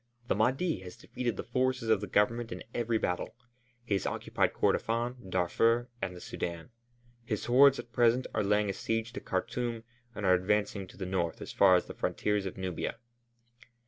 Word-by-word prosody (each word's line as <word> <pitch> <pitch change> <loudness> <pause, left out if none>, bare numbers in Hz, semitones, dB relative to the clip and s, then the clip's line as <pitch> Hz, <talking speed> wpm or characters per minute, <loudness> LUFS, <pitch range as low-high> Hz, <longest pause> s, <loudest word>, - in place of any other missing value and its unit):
The - - +4
Mahdi 130 - +1
has 90 -1 -10
defeated 120 -5 -3
the - - -3
forces 130 -1 0
of 110 -2 +4
the 105 - -4
Government 115 +3 +1
in - - -6
every 120 -1 0
battle. 100 +2 -2 0.5
He 105 - -1
has 100 - 0
occupied - - 0
Kordofân, 120 -1 0
Darfur, 115 +7 +2
and 90 -1 -3
the - - -9
Sudân; 85 0 -5 0.5
his 110 -3 -3
hordes 135 +3 +6
at 120 - -9
present 120 +2 +3
are 110 - +1
laying 105 +1 +2
a 100 - -1
siege 115 +3 -2
to 135 - -5
Khartûm 115 +3 -2 0.3
and 105 - -3
are 90 - +6
advancing 100 +1 +1
to - - -15
the 95 - -4
north 90 -3 -1
as - - -7
far 95 -2 +6
as 90 - +2
the - - -8
frontiers 105 -2 -1
of 95 - -7
Nubia." 95 +1 -3
110 Hz, 185 wpm, -31 LUFS, 95-120 Hz, 0.5 s, hordes